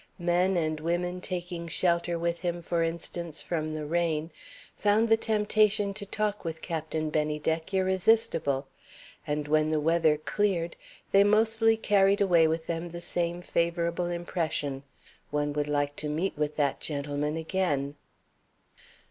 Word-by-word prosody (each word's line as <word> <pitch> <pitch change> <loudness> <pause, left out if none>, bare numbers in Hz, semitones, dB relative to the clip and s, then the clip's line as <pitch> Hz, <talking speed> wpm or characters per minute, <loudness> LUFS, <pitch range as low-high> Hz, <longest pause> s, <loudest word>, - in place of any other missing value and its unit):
Men 175 +1 +2
and 155 -2 0
women 175 +3 -2
taking 175 -2 -4
shelter 170 0 +1
with 170 0 -1
him, 175 -1 -3
for 170 0 0
instance, 165 0 -3
from 155 -2 -3
the 155 -1 -4
rain, 165 0 0 0.4
found 210 +2 +2
the 225 - +7
temptation 210 -2 +2
to 200 0 -5
talk 210 0 -2
with 160 -2 -5
Captain 160 -2 -3
Bennydeck 155 +2 -1
irresistible; 190 -6 +2 0.6
and, 150 0 -2
when 155 +1 +3
the 155 -1 +1
weather 160 0 +3
cleared, 170 0 -1 0.4
they 195 0 +6
mostly 225 +2 +3
carried 200 -2 +3
away 175 -5 +5
with 160 +1 -1
them 170 +1 -3
the 170 +1 -7
same 175 0 -2
favorable 170 0 0
impression: 165 -5 -2 0.5
"One 145 0 -1
would 145 0 -1
like 145 -1 0
to 150 - -3
meet 165 +6 -1
with 150 0 -2
that 145 -3 0
gentleman 145 +1 -2
again." 160 -5 -1
170 Hz, 140 wpm, -28 LUFS, 155-190 Hz, 0.6 s, the